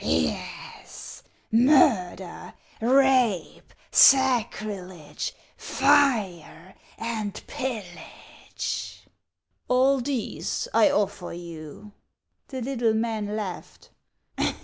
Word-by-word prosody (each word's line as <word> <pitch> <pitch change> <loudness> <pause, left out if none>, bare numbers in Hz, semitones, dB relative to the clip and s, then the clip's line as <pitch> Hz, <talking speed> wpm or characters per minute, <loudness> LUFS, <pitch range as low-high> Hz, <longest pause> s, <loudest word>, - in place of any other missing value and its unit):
" - - -11
Yes, 80 -1 -4 0.2
— - - -36
murder, 225 - +2 0.3
rape, 250 -6 +2 0.2
sacrilege, 210 - +2 0.2
fire, 220 - +1 0.2
and 220 -3 -4
pillage." 230 -11 -6 0.3
" - - -51
All 260 +1 +3
these 265 - -3
I 305 - +5
offer 205 -8 -1
you." 170 +3 -10 0.6
The 260 -3 -6
little 235 -4 0
man 220 -2 -2
laughed. 200 -5 -7
220 Hz, 80 wpm, -25 LUFS, 185-260 Hz, 0.6 s, I